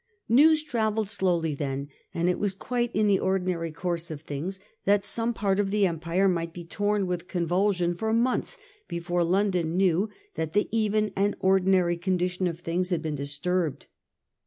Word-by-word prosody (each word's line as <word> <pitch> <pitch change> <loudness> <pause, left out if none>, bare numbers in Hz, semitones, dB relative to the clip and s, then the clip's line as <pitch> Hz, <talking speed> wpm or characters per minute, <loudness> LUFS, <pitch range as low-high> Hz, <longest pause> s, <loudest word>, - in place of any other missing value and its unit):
News 305 +6 +6
travelled 220 -6 0
slowly 175 -6 +1
then; 140 -1 -3 0.2
and 170 +1 0
it 180 - +1
was 200 -2 -1
quite 240 +3 -1
in 215 +1 +3
the 200 -2 +4
ordinary 180 -3 -1
course 170 +1 -3
of 155 -2 -6
things 160 +6 -5 0.3
that 200 0 +3
some 230 +3 0
part 200 -3 0
of 200 -1 +1
the 205 0 +3
empire 170 +2 +1
might 170 -2 -1
be 175 - -7
tom 205 +3 0
with 180 -1 -3
convulsion 180 0 +1
for 220 +5 -2
months 235 +3 +1 0.3
before 175 0 -1
London 180 -2 +1
knew 190 +2 +2 0.2
that 160 0 -3
the 210 - +2
even 215 -1 +1
and 200 +1 +1
ordi 190 0 +3
nary 180 -3 +3
condition 180 +1 0
of 170 0 -5
things 175 +2 -1
had 170 -3 -1
been 155 -1 -2
disturbed. 150 +3 -2
185 Hz, 175 wpm, -27 LUFS, 170-205 Hz, 0.3 s, News